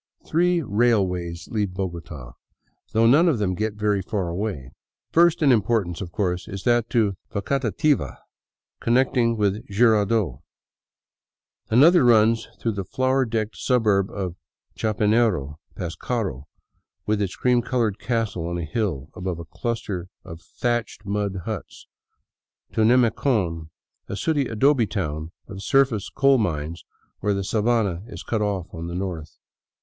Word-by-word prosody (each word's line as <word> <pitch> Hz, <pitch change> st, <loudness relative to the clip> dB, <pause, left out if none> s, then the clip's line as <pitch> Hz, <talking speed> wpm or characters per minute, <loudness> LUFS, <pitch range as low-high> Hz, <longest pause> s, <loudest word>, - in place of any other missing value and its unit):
Three 175 Hz, +1 st, +2 dB
railways 95 Hz, -7 st, 0 dB
leave 105 Hz, -5 st, -1 dB
Bogota, 85 Hz, -9 st, -5 dB, 0.6 s
though 115 Hz, +1 st, +3 dB
none 150 Hz, +9 st, +6 dB
of 145 Hz, -, +1 dB
them 100 Hz, -3 st, 0 dB
gets 105 Hz, +3 st, -2 dB
very 105 Hz, -1 st, +1 dB
far 95 Hz, -2 st, -2 dB
away. 85 Hz, -8 st, -4 dB, 0.4 s
First 170 Hz, 0 st, +4 dB
in 140 Hz, -, +6 dB
importance, 105 Hz, -6 st, +1 dB
of 90 Hz, -3 st, -6 dB
course, 90 Hz, -2 st, -2 dB
is 100 Hz, -3 st, -6 dB
that 120 Hz, -1 st, +2 dB
to 105 Hz, -5 st, +1 dB
Facatativa, 135 Hz, +6 st, 0 dB, 0.6 s
connect 125 Hz, +3 st, +2 dB
ing 115 Hz, -2 st, +2 dB
with 105 Hz, +1 st, 0 dB
Jirardot. 105 Hz, -, +2 dB, 1.3 s
Another 155 Hz, +9 st, +6 dB
runs 115 Hz, -1 st, +4 dB
through 115 Hz, -, 0 dB
the 100 Hz, -2 st, -4 dB
flower 130 Hz, +6 st, +1 dB
decked 110 Hz, -2 st, -2 dB
suburb 105 Hz, -6 st, +2 dB
of 90 Hz, -3 st, -5 dB, 0.4 s
Chapinero, 105 Hz, -, +1 dB, 0.2 s
past 85 Hz, -1 st, -5 dB
Caro, 95 Hz, -, -3 dB, 0.6 s
with 105 Hz, 0 st, 0 dB
its 95 Hz, -2 st, -2 dB
cream 125 Hz, -1 st, +2 dB
colored 115 Hz, -5 st, -1 dB
castle 110 Hz, -7 st, -2 dB
on 85 Hz, 0 st, -3 dB
a 85 Hz, -, -3 dB
hill 80 Hz, -, -2 dB
above 90 Hz, -2 st, -4 dB
a 85 Hz, -, -8 dB
cluster 100 Hz, -1 st, -4 dB, 0.2 s
of 85 Hz, 0 st, -10 dB
thatched 120 Hz, -3 st, -3 dB
mud 100 Hz, -2 st, -2 dB
huts, 110 Hz, -4 st, -6 dB, 0.9 s
to -, -, 0 dB
Nemecon, 110 Hz, -, +2 dB, 0.4 s
a -, -, -4 dB
sooty 145 Hz, +3 st, 0 dB
adobe 120 Hz, +1 st, +3 dB
town 80 Hz, -6 st, -3 dB, 0.2 s
of 95 Hz, 0 st, -8 dB
surface 130 Hz, -4 st, +2 dB
coal 135 Hz, -1 st, +3 dB
mines 80 Hz, -4 st, -3 dB, 0.3 s
where 105 Hz, 0 st, 0 dB
the 100 Hz, -, -2 dB
sabana 105 Hz, -4 st, +1 dB
is -, -, -9 dB
cut 110 Hz, -2 st, -1 dB
off 100 Hz, -4 st, -1 dB
on 85 Hz, +1 st, -5 dB
the 85 Hz, -, -5 dB
north. 90 Hz, -5 st, -5 dB
105 Hz, 140 wpm, -24 LUFS, 90-120 Hz, 1.3 s, none